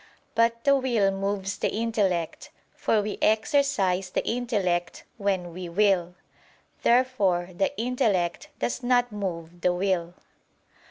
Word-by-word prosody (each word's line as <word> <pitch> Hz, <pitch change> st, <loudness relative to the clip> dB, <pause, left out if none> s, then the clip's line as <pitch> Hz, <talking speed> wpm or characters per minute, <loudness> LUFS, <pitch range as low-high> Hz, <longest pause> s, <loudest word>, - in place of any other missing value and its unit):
But 230 Hz, 0 st, +2 dB
the 280 Hz, 0 st, +5 dB
will 240 Hz, -7 st, +2 dB
moves 195 Hz, 0 st, -2 dB
the -, -, +1 dB
intellect; 205 Hz, -7 st, -1 dB, 0.2 s
for 215 Hz, -2 st, +1 dB
we 210 Hz, 0 st, -4 dB
exercise 215 Hz, -, +2 dB
the -, -, -2 dB
intellect 200 Hz, -8 st, -1 dB
when 190 Hz, -4 st, -1 dB
we 180 Hz, 0 st, -6 dB
will. 180 Hz, -2 st, +2 dB, 0.7 s
Therefore 210 Hz, -8 st, +2 dB
the 195 Hz, +1 st, -1 dB
intellect 215 Hz, -8 st, 0 dB
does 245 Hz, -, -2 dB
not 245 Hz, -1 st, +2 dB
move 175 Hz, -4 st, -5 dB
the 180 Hz, 0 st, +2 dB
will. 180 Hz, -2 st, -1 dB
200 Hz, 120 wpm, -26 LUFS, 180-230 Hz, 0.7 s, the